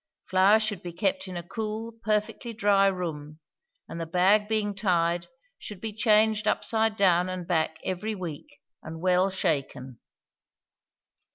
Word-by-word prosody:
Flour 190 +3 +5
should 215 -4 -3
be 175 - -6
kept 190 +1 -1
in 185 -1 -6
a 170 - -5
cool, 220 +2 -4
perfectly 215 +2 -1
dry 200 -2 +3
room, 155 -5 -4 0.5
and 165 - -6
the 165 - -4
bag 190 +5 +3
being 215 -2 0
tied 175 -3 0 0.3
should 205 -3 -9
be 220 +1 -5
changed 215 0 +3
upside 220 0 +1
down 185 -3 +3
and 185 -1 -5
back 160 -2 0
every 200 +4 -3
week, 170 -6 -8 0.2
and 160 +1 -8
well 185 +2 +2
shaken. 140 - -2
190 Hz, 145 wpm, -27 LUFS, 175-215 Hz, 0.5 s, Flour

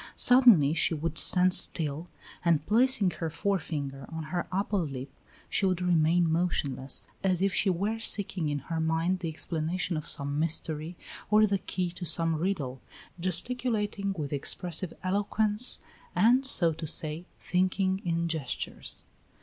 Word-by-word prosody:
Suddenly 240 - +6
she 165 0 +1
would 160 0 -1
stand 180 0 +5
still, 160 -3 0 0.4
and 165 -3 +1
placing 225 -2 +3
her 165 -2 -4
forefinger 150 -7 -3
on 160 -1 -5
her 175 - -2
upper 200 +2 -1
lip 135 -5 -5 0.4
she 195 - 0
would 185 -2 0
remain 170 -1 +2
motionless, 150 -6 -1 0.2
as 185 -1 +1
if 195 -1 +1
she 195 - +2
were 200 +5 -1
seeking 190 -7 +1
in 145 - -2
her 160 +4 -5
mind 165 +3 0
the 170 -2 -4
explanation 165 +2 -3
of 155 - -6
some 140 +1 +1
mystery 160 +1 -2 0.3
or 215 0 +5
the 200 -2 0
key 180 -2 -3
to 180 +1 -9
some 165 -1 +3
riddle, 150 -7 -3 0.4
gesticulating 205 +2 -1
with 145 -2 -4
expressive 170 +4 -2
eloquence, 210 +4 +2 0.4
and, 240 +8 +3
so 170 -10 +4
to 160 0 -6
say, 160 +2 0
thinking 185 +1 0
in 170 -1 -1
gestures. 160 -6 -4
175 Hz, 145 wpm, -28 LUFS, 155-195 Hz, 0.4 s, Suddenly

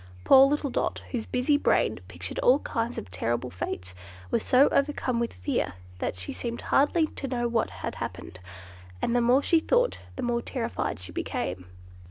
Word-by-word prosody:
Poor 270 0 +8
little 285 -1 -1
Dot, - - -1
whose 235 -4 -3
busy 255 +4 +2
brain 110 - +2
pictured 90 -1 -6
all 255 +2 +5
kinds 235 -3 -3
of 95 - -6
terrible 120 +6 -2
fates, 90 -1 -5 0.4
was - - +2
so 260 +3 +5
overcome 275 -4 0
with 235 - -1
fear 90 0 -2 0.3
that - - -2
she 95 +1 -5
seemed 235 -1 -4
hardly 315 +4 +3
to 290 -2 -6
know 240 -2 -1
what 230 -1 0
had, - - -5
happened; 90 - -6 0.6
and 235 - 0
the 245 - +4
more 250 +4 +4
she 335 - +4
thought, - - +1 0.2
the 260 - -4
more 240 -1 0
terrified 235 - -3
she 90 +1 -8
became. 90 0 -3
240 Hz, 180 wpm, -27 LUFS, -, 0.6 s, Poor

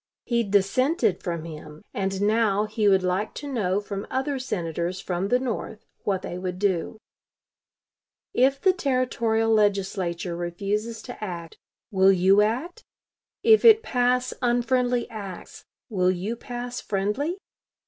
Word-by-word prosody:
He 235 -1 +1
dissented 205 - +2
from 170 -2 -3
him, 155 0 -10
and 195 0 -1
now 210 -1 +2
he 215 0 0
would 190 -2 +4
like 185 +4 -1
to 290 - -6
know 205 -8 0
from 200 -1 -6
other 270 +1 -1
Senators 175 -6 -3
from 180 +1 -2
the 245 - +3
North 225 -3 -4 0.2
what 195 -2 0
they 175 - -5
would 180 -1 -4
do: 190 0 0 1.4
"If 270 +2 +3
the 375 +3 +4
Territorial 240 -7 +1
Legislature 190 -4 0
refuses 205 +6 -3
to - - -8
act, 170 -4 -6 0.3
will 190 -1 +5
you 190 +2 +5
act? 250 +12 -1 0.6
If 440 -1 +6
it 450 -1 +8
pass 250 - +1
unfriendly 245 0 +1
acts, 200 -5 -8 0.2
will 185 -6 +1
you 185 +5 -2
pass 245 +1 -6
friendly? 210 - -1
210 Hz, 135 wpm, -25 LUFS, 185-245 Hz, 1.4 s, it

